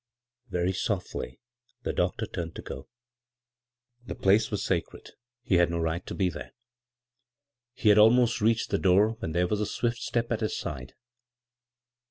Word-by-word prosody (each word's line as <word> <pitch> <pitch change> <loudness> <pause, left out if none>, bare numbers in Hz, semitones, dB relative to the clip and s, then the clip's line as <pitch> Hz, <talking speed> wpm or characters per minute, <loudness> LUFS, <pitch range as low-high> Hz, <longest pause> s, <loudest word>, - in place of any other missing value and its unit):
Very 90 +1 0
softly 90 - -3 0.4
the - - -2
doctor - - 0
turned 85 -2 -6
to - - -7
go. 65 - -8 1.1
The - - -6
place 100 +3 +3
was 105 -1 -2
sacred 85 -4 -3 0.2
— 125 0 -65
he 95 - +2
had 85 -1 +4
no 85 - -2
right 80 +1 -1
to - - -5
be 95 - +1
there. 90 - -7 1.2
He 110 - +2
had 105 0 +7
almost 115 +1 +5
reached 115 +1 +1
the - - +1
door 95 +3 +4
when 80 - -4
there 90 +1 +2
was 105 +3 -1
a 105 - 0
swift 120 -1 -1
step 120 0 -2
at 115 - 0
his 110 - -1
side. 65 0 -6
100 Hz, 170 wpm, -28 LUFS, 85-110 Hz, 1.2 s, had